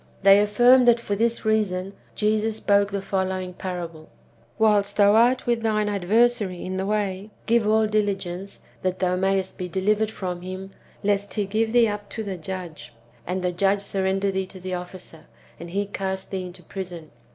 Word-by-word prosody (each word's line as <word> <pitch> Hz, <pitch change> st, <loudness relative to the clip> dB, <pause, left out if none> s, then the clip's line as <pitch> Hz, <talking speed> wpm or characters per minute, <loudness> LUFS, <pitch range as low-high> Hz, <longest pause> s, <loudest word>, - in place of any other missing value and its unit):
They 195 Hz, +1 st, +8 dB
affirm 240 Hz, +5 st, +5 dB
that 240 Hz, -1 st, +5 dB
for 205 Hz, -3 st, -2 dB
this 230 Hz, +2 st, 0 dB
reason 200 Hz, -3 st, 0 dB, 0.2 s
Jesus 215 Hz, +1 st, +1 dB
spoke 200 Hz, -2 st, +2 dB
the 200 Hz, -1 st, -3 dB
following 190 Hz, -1 st, -2 dB
parable: 170 Hz, -4 st, -6 dB, 0.2 s
— 115 Hz, -, -33 dB
" 115 Hz, +1 st, -35 dB
Whilst 205 Hz, -2 st, +2 dB
thou 205 Hz, 0 st, +6 dB
art 240 Hz, +3 st, +4 dB
with 235 Hz, -1 st, +1 dB
thine 215 Hz, -2 st, +1 dB
adversary 205 Hz, -1 st, +1 dB
in 185 Hz, 0 st, -3 dB
the 190 Hz, +1 st, -2 dB
way, 205 Hz, -1 st, -2 dB, 0.2 s
give 230 Hz, -2 st, +2 dB
all 220 Hz, 0 st, +4 dB
diligence, 200 Hz, -3 st, -2 dB, 0.2 s
that 185 Hz, 0 st, -1 dB
thou 180 Hz, -1 st, +1 dB
mayest 190 Hz, 0 st, 0 dB
be 180 Hz, -1 st, -4 dB
delivered 210 Hz, +4 st, +1 dB
from 180 Hz, -4 st, -5 dB
him, 185 Hz, +1 st, -7 dB, 0.3 s
lest 200 Hz, 0 st, 0 dB
he 210 Hz, -2 st, 0 dB
give 220 Hz, +3 st, 0 dB
thee 240 Hz, -1 st, +5 dB
up 205 Hz, -1 st, -5 dB
to 220 Hz, -, -5 dB
the 195 Hz, -2 st, -4 dB
judge, 165 Hz, -9 st, -7 dB, 0.3 s
and 180 Hz, +1 st, -2 dB
the 180 Hz, -, +1 dB
judge 195 Hz, +3 st, +1 dB
surrender 195 Hz, 0 st, -1 dB
thee 190 Hz, 0 st, -2 dB
to 190 Hz, 0 st, -11 dB
the 185 Hz, 0 st, -5 dB
officer, 180 Hz, -3 st, -8 dB, 0.3 s
and 170 Hz, +1 st, -8 dB
he 200 Hz, +3 st, -1 dB
cast 190 Hz, -1 st, -4 dB
thee 185 Hz, -2 st, -3 dB
into 180 Hz, -, -12 dB
prison. 175 Hz, -5 st, -7 dB
195 Hz, 185 wpm, -24 LUFS, 185-210 Hz, 0.3 s, They